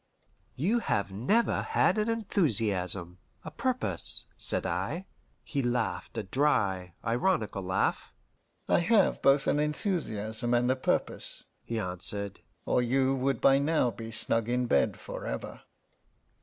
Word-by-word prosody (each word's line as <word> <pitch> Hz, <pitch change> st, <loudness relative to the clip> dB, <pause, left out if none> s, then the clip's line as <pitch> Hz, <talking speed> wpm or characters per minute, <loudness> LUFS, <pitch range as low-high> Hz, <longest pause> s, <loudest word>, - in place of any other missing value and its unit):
"You 205 Hz, -, +1 dB
have 100 Hz, -, -1 dB
never 165 Hz, -, +2 dB
had -, -, +2 dB
an 215 Hz, +2 st, 0 dB
enthusiasm, 105 Hz, -, 0 dB, 0.3 s
a -, -, -6 dB
purpose?" 255 Hz, -1 st, -2 dB
said -, -, +1 dB
I. 185 Hz, +3 st, -2 dB, 0.4 s
He 140 Hz, -, -2 dB
laughed, 120 Hz, -1 st, -2 dB
a 110 Hz, -, -1 dB
dry, 95 Hz, -, 0 dB
ironical 115 Hz, -, 0 dB
laugh. 95 Hz, 0 st, -1 dB, 0.6 s
"I -, -, +4 dB
have 200 Hz, +3 st, +3 dB
both 140 Hz, 0 st, +4 dB
an 145 Hz, -, +2 dB
enthusiasm 120 Hz, -, -1 dB
and 125 Hz, +1 st, +3 dB
a -, -, +2 dB
purpose," 130 Hz, -, -2 dB, 0.2 s
he 115 Hz, -, -4 dB
answered, 100 Hz, +1 st, -1 dB, 0.3 s
"or -, -, +2 dB
you 130 Hz, +2 st, +2 dB
would 135 Hz, -2 st, 0 dB
by 135 Hz, 0 st, +5 dB
now 145 Hz, -4 st, +2 dB
be 115 Hz, 0 st, -8 dB
snug 115 Hz, 0 st, -1 dB
in 125 Hz, +1 st, +1 dB
bed 70 Hz, -, +2 dB
forever." -, -, -6 dB
125 Hz, 130 wpm, -29 LUFS, 105-150 Hz, 0.6 s, by